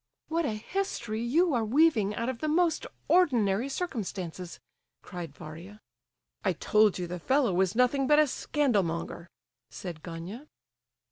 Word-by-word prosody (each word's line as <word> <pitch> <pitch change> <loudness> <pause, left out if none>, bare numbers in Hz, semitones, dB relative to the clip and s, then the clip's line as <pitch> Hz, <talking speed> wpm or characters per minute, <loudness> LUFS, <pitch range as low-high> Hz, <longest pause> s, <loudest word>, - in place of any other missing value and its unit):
"What 330 0 0
a 225 - -1
history 230 - -3
you 310 +8 +2
are 235 -3 +1
weaving 225 -4 +3
out 230 - -2
of 255 -3 -3
the 310 - -2
most 325 +1 +2 0.2
ordinary 245 - +3
circumstances!" 190 - -4 0.4
cried 175 -4 -7
Varia. 170 +7 -10 0.6
"I 190 - +2
told 210 +4 +3
you 180 - -3
the 175 +1 -5
fellow 260 - +2
was 190 +2 +1
nothing 250 +2 +3
but 295 - +5
a 305 - +6
scandal 275 -5 +1
monger," 170 0 -4 0.4
said 170 -4 -7
Gania. 180 - -8
225 Hz, 145 wpm, -29 LUFS, 185-290 Hz, 0.6 s, a